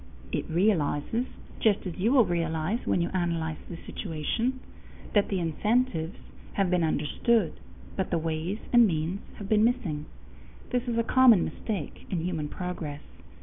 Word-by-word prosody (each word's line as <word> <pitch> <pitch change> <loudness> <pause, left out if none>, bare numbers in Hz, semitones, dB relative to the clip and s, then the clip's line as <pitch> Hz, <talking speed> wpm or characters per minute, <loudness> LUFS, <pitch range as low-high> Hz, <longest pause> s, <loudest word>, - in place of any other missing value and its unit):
It - - -2
realizes, 175 - +1 0.3
just 210 -3 +2
as 180 - -4
you 215 +6 +1
will 260 -5 +6
realize 170 +3 0
when 175 - +2
you 170 - 0
analyze 165 -3 -1
the 170 - -6
situation, 225 - -2 0.5
that 205 -1 +4
the 195 - 0
incentives 175 +1 0 0.4
have 195 -3 +1
been 180 -2 +3
understood, 160 +6 +1 0.4
but 190 - -1
the 170 - +1
ways 165 +4 -2 0.2
and 240 -2 +8
means 165 +2 -1 0.2
have 200 - -7
been 215 +1 +4
missing. 205 -12 0 0.6
This 245 0 0
is 235 -1 0
a 230 - +3
common 240 -5 +6
mistake 195 -10 -5
in 175 -4 -1
human 160 -5 -2
progress. 165 -5 -5
180 Hz, 150 wpm, -28 LUFS, 160-225 Hz, 0.6 s, and